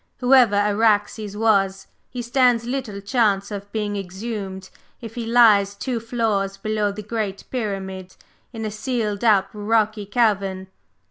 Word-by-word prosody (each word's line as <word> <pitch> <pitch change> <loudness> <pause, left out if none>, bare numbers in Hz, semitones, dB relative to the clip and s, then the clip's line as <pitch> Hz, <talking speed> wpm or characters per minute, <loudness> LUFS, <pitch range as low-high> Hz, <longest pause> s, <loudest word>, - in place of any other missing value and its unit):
Whoever 250 -4 +5
Araxes 210 0 +1
was, 195 -3 +2 0.2
he 245 -1 -5
stands 240 -1 +2
little 240 -6 -4
chance 200 -2 +1
of 200 0 -7
being 210 -2 -2
exhumed 195 0 -6 0.3
if 225 -2 -9
he 235 -1 -5
lies 215 -4 +5
two 240 +3 -3
floors 215 -4 -1
below 210 0 -1
the 210 +1 -7
Great 210 -2 -4
Pyramid 190 -6 -4 0.4
in 225 -2 -5
a 215 - -3
sealed 215 -2 -2
up 200 -4 +4
rocky 215 0 0
cavern! 195 -4 0
210 Hz, 135 wpm, -22 LUFS, 200-230 Hz, 0.4 s, Whoever